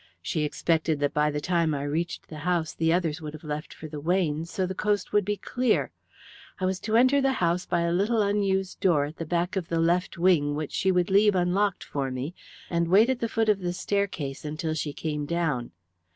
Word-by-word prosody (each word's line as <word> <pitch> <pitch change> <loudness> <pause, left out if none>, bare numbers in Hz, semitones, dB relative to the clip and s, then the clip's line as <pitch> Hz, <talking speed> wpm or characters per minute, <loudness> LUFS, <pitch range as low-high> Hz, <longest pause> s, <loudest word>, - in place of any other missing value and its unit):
She 160 - -1
expected 160 0 0
that 145 - +1
by 150 0 +2
the 150 0 -2
time 165 -1 +1
I 140 - -3
reached 165 +5 -3
the 155 - -8
house 170 0 0
the 165 0 +1
others 165 -3 0
would 150 -1 -6
have 155 - -10
left 150 +1 -5
for 155 - -9
the 150 -1 -7
Weynes, 165 -1 0
so 190 - -1
the 185 - -3
coast 205 0 -1
would 205 - +4
be 205 +2 -2
clear. 250 +1 0 0.7
I 185 - 0
was 185 0 0
to 220 +2 +1
enter 260 +3 +5
the 270 0 +2
house 175 -4 0
by 175 -1 +1
a 170 0 +1
little 205 +6 +1
unused 195 -2 0
door 155 -6 +3
at 150 +2 -9
the 165 - -5
back 175 +3 0
of 185 -4 -2
the 165 - -1
left 170 +2 +1
wing 165 -5 +3
which 150 -1 -4
she 190 - +1
would 180 +1 +1
leave 205 +1 +5
unlocked 185 +2 +1
for 140 -2 -3
me, 130 +6 -4 0.3
and 170 -1 0
wait 210 +8 +5
at 255 - -2
the 230 - -1
foot 225 0 0
of 210 -2 +3
the 175 -2 -2
staircase 185 -7 -2
until 155 +2 -3
she 155 -1 -2
came 150 -1 -3
down. 160 -8 -1
170 Hz, 225 wpm, -27 LUFS, 155-190 Hz, 0.7 s, enter